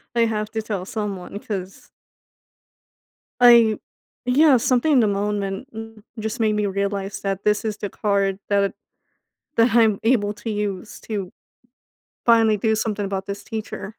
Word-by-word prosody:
I 235 - +3
have 215 -1 -2
to 220 - -2
tell 200 -4 -4
someone 205 -2 -5
'cause 195 -3 -7 1.5
like 235 -3 +6 0.5
yeah, 270 +1 +5
something 255 +6 +2
in 260 - +6
the 220 - +4
moment 200 +2 -2 0.5
just 220 +3 -4
made 215 -1 +2
me 210 -1 0
realize 200 0 -2
that 195 -1 -3
this 210 0 +2
is 215 -1 -3
the 205 - -4
card 200 -2 0
that 200 -1 +2 0.8
that 230 0 +4
I'm 220 -4 +4
able 220 -3 +2
to 225 +1 -6
use 205 -2 -4
to 200 -5 -4 0.9
finally 225 -2 +5
do 220 +2 +1
something 210 -2 -2
about 195 -1 -3
this 200 0 -5
teacher. 220 -2 -5
210 Hz, 145 wpm, -22 LUFS, 200-225 Hz, 1.5 s, like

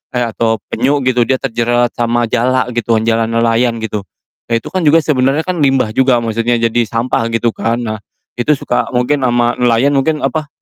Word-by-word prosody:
eh 125 - +1
atau 115 -1 -1
penyu 140 +5 +1
gitu 125 -2 +1
dia 130 - +2
terjerat 120 -1 0
sama 120 0 +1
jala 125 +1 +1
gitu 120 -1 0
kan 110 - 0
jala 115 0 +1
nelayan 115 0 +1
gitu. 105 -2 -3 0.5
Nah - - -1
itu - - -7
kan 185 - -1
juga 160 +1 +4
sebenernya 135 +1 +1
kan 180 -3 -3
limbah 135 -6 +2
juga 125 -1 +2
maksudnya 115 +1 0
jadi 115 +1 +1
sampah 115 0 -1
gitu 115 0 +1
kan. 115 +1 -2
Nah 110 -2 -4 0.4
itu 150 +5 +2
suka 125 - -2
mungkin 130 +3 +1
sama 120 0 +1
nelayan 125 +3 +3
mungkin, 150 +3 0
apa, 155 -2 -1
120 Hz, 190 wpm, -14 LUFS, 115-130 Hz, 0.5 s, juga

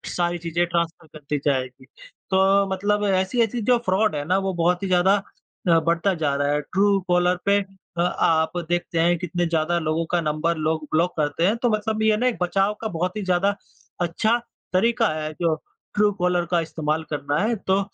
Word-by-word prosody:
सारी 175 0 0
चीज़ें 170 +1 -1
ट्रांसफर 170 -1 -2
कर 155 0 -13
दी 150 - +1
जाएगी। 130 -2 -1 0.5
तो 195 +1 +4
मतलब 205 +2 0
ऐसी-ऐसी 220 +5 +1
जो 245 +3 +3
फ्रॉड 190 0 +2
है 145 - -2
ना 185 +2 +3
वो 195 -1 -1
बहुत 175 +2 +1
ही - - -1
ज़्यादा 185 +2 +4 0.5
अ, 165 -1 +6
बढ़ता 170 +4 +1
जा 155 -5 -1
रहा 145 0 0
है। 150 - 0
ट्रूकॉलर 180 0 +1
पे 200 0 +4 0.4
अ - - +2
आप 160 -2 +2 0.2
देखते 175 -1 -1
हैं 170 +1 +3
कितने 175 0 -2
ज़्यादा 165 +1 0
लोगों 160 +1 -1
का 175 - +2
नंबर 155 +2 -1
लोग 155 0 -1
ब्लॉक 170 +3 +2
करते 150 +2 0
हैं 210 - +2
तो 245 - +2
मतलब 215 0 -1
ये 215 -1 +3
न 235 - -2
एक 250 -2 +1
बचाव 195 +3 +1
का 225 - -2
बहुत 180 +1 -3
ही - - -2
ज़्यादा 185 +2 +1 0.5
अच्छा 215 +7 +1 0.4
तरीका 230 +6 +3
है 155 0 -4
जो 165 -2 +2 0.4
ट्रूकॉलर 180 -4 +1
का 175 - +3
इस्तेमाल 155 -1 -2
करना 145 0 -1
है। 225 +3 +1
तो 190 +1 +3
175 Hz, 190 wpm, -23 LUFS, 160-195 Hz, 0.5 s, अ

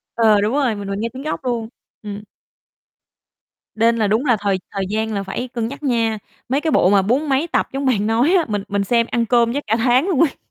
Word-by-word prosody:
Ờ, 215 -3 +4
đúng 215 +5 0
rồi, 270 -6 +1
mình 200 -1 -6
mình 200 +1 -3
nghe 230 +1 -2
tiếng 265 +2 -8
gốc 305 -3 -4
luôn, 230 -2 -2 0.3
ừm. 205 0 -6 1.5
Nên 230 +1 +3
là 215 -2 +1
đúng 220 +7 +1
là 240 -5 +3
thời 195 -2 0
thời 195 -1 -2
gian 220 +1 -2
là 200 -1 -2
phải 245 +6 -4
cân 235 -2 -3
nhắc 280 +4 -9
nha. 230 -4 +1 0.3
Mấy 275 +3 +1
cái 320 - 0
bộ 185 - +4
mà 200 -1 +4
bốn 265 +9 0
mấy 275 +5 +1
tập - - 0
giống 275 0 -2
bạn 215 -5 +1
nói 240 +10 +2
á, 330 - +1
mình 205 -2 -2
mình 200 0 -1
xem 235 +2 +2
ăn 235 -1 +1
cơm 235 0 +2
chắc 285 - -2
cả 220 - +2
tháng 250 +5 +3
luôn 330 -8 0
ấy. 305 -5 +2
230 Hz, 245 wpm, -20 LUFS, 210-265 Hz, 1.5 s, Ờ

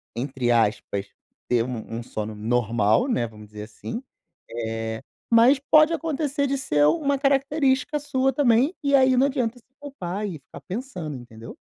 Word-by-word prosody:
entre 130 -1 -1
aspas, 105 -3 0 0.4
ter 120 -2 +3
um 120 -3 -6
um - - -7
sono 110 -2 -5
normal, 110 - +1
né, 235 - 0
vamos 105 -1 -13
dizer 105 0 -9
assim, 225 - -7 0.5
eh, 110 -1 -4 0.3
mas 235 +5 +6
pode 310 +1 +7
acontecer 295 -2 -1
de 275 +1 -1
ser 150 - +2
uma 285 -4 +1
característica 275 +1 +1
sua 270 -2 0
também, 260 +4 +3
e 280 0 +1
aí 260 -1 +4
não 260 - +5
adianta 250 -4 -2
se - - -30
culpar 210 -8 -5
e 190 - -5
ficar 135 - -13
pensando, 185 - -5
entendeu? 115 -2 -11
215 Hz, 160 wpm, -24 LUFS, -, 0.5 s, pode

